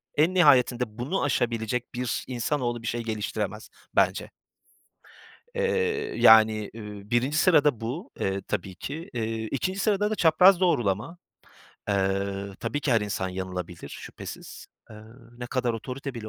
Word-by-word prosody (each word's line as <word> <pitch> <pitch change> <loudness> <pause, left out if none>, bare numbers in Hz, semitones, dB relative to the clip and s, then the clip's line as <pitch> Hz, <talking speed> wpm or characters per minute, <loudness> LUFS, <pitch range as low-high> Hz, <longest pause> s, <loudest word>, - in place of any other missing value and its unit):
en 160 +5 +3
nihayetinde 125 -8 +4
bunu 145 +10 -2
aşabilecek 120 -3 -1
bir 125 -1 -2
insanoğlu 120 -1 -2
bir 115 - -6
şey 120 0 -2
geliştiremez, 105 -1 -4 0.3
bence. - - +2 1.3
Eee, 460 -3 0
yani, 110 -1 +6
iii, 105 -1 -9
1’inci 130 +6 +1
sırada 150 - +4
bu, 145 - -5
eee, 95 0 -1
tabii 95 -2 -3
ki. 150 - -7
Eee, 115 -1 -2
2'nci 185 +8 -2
sırada 210 0 +1
da - - 0
çapraz 180 +2 +6
doğrulama. 120 - 0 0.7
Eee, 100 0 -1
tabii 145 - -2
ki 145 -3 +1
her 115 - +4
insan 100 -2 -2
yanılabilir, 90 -2 -6
şüphesiz. - - -9 0.2
Eee, 110 - -10 0.4
ne 125 - -5
kadar 125 -2 -1
otorite 130 +4 -6
bile 110 -2 -6
120 Hz, 135 wpm, -26 LUFS, 105-150 Hz, 1.3 s, yani